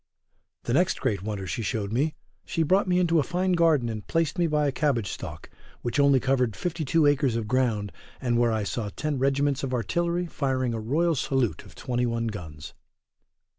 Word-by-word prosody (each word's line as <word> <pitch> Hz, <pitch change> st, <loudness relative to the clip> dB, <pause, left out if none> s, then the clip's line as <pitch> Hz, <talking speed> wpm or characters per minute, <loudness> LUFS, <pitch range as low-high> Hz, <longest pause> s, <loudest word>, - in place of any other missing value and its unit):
The 120 Hz, -, -2 dB
next 175 Hz, +6 st, +2 dB
great 110 Hz, -9 st, -1 dB
wonder 100 Hz, -1 st, -4 dB
she 105 Hz, -, -3 dB
showed 105 Hz, -2 st, -2 dB
me, 150 Hz, +6 st, +1 dB, 0.3 s
she 165 Hz, -, -1 dB
brought 190 Hz, +5 st, +3 dB
me 180 Hz, -1 st, +2 dB
into 170 Hz, -2 st, +3 dB
a -, -, +4 dB
fine 180 Hz, +5 st, -1 dB
garden 165 Hz, -8 st, +3 dB
and 110 Hz, -3 st, -5 dB
placed 165 Hz, +2 st, 0 dB
me 170 Hz, -, +3 dB
by 150 Hz, -1 st, +1 dB
a 140 Hz, -, +2 dB
cabbage 130 Hz, -8 st, 0 dB
stalk, -, -, -7 dB, 0.4 s
which 120 Hz, +4 st, -1 dB
only 140 Hz, -2 st, +5 dB
covered 125 Hz, -4 st, +1 dB
52 165 Hz, -2 st, 0 dB
acres 145 Hz, -4 st, +3 dB
of 115 Hz, -2 st, -2 dB
ground, 115 Hz, -5 st, 0 dB, 0.3 s
and 120 Hz, -2 st, +1 dB
where 120 Hz, -1 st, +3 dB
I 110 Hz, -1 st, 0 dB
saw 105 Hz, +1 st, -3 dB
ten 150 Hz, +5 st, -3 dB
regiments 140 Hz, +1 st, +1 dB
of 130 Hz, -2 st, -2 dB
artillery 170 Hz, -, 0 dB
firing 130 Hz, -6 st, -1 dB
a 115 Hz, -, -2 dB
royal 155 Hz, +10 st, +1 dB
salute 135 Hz, -4 st, -1 dB
of -, -, -15 dB
21 120 Hz, -2 st, -1 dB
guns. 80 Hz, -8 st, -8 dB
130 Hz, 190 wpm, -26 LUFS, 115-155 Hz, 0.4 s, only